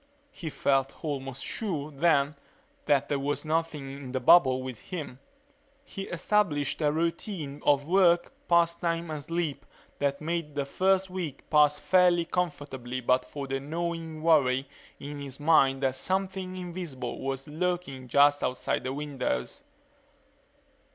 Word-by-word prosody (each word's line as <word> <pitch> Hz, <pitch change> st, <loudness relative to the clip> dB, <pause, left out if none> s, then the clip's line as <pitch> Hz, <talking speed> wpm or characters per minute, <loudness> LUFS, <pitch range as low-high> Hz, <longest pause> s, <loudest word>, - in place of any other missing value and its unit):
He 170 Hz, -11 st, -6 dB
felt 135 Hz, +1 st, 0 dB
almost 135 Hz, -3 st, -4 dB
sure, 160 Hz, -10 st, -3 dB
then, 145 Hz, -1 st, +2 dB, 0.5 s
that 140 Hz, -2 st, +3 dB
there 145 Hz, -, 0 dB
was 145 Hz, +3 st, -2 dB
nothing 155 Hz, -3 st, -1 dB
in 135 Hz, -2 st, -8 dB
the 130 Hz, -, 0 dB
bubble 130 Hz, -2 st, +6 dB
with 130 Hz, -3 st, -6 dB
him. 155 Hz, -8 st, -7 dB, 0.6 s
He 195 Hz, -8 st, -7 dB
established 170 Hz, -6 st, 0 dB
a 150 Hz, -1 st, +3 dB
routine 165 Hz, -2 st, -3 dB
of 145 Hz, 0 st, +3 dB
work, 175 Hz, -1 st, +4 dB
pastime 170 Hz, -1 st, +2 dB
and 150 Hz, -2 st, -5 dB
sleep 165 Hz, -2 st, -2 dB, 0.4 s
that 140 Hz, 0 st, 0 dB
made 160 Hz, -2 st, -3 dB
the 140 Hz, -1 st, -1 dB
first 190 Hz, +5 st, +1 dB
week 170 Hz, -7 st, -5 dB
pass 150 Hz, -1 st, +5 dB
fairly 180 Hz, 0 st, +4 dB
comfortably 140 Hz, -8 st, -3 dB
but 125 Hz, +1 st, +2 dB
for 140 Hz, -1 st, -6 dB
the 135 Hz, 0 st, -2 dB
gnawing 165 Hz, +1 st, -4 dB
worry 135 Hz, -5 st, +3 dB, 0.3 s
in 145 Hz, +1 st, -7 dB
his 140 Hz, -1 st, -7 dB
mind 140 Hz, -3 st, +4 dB
that 130 Hz, -1 st, +2 dB
something 185 Hz, +4 st, -2 dB
invisible 170 Hz, -9 st, -5 dB
was 135 Hz, 0 st, -3 dB
lurking 155 Hz, -5 st, -3 dB
just 145 Hz, +3 st, +5 dB
outside 125 Hz, -, -1 dB
the 130 Hz, +1 st, -3 dB
windows. 150 Hz, -, -3 dB
150 Hz, 140 wpm, -28 LUFS, 135-170 Hz, 0.6 s, bubble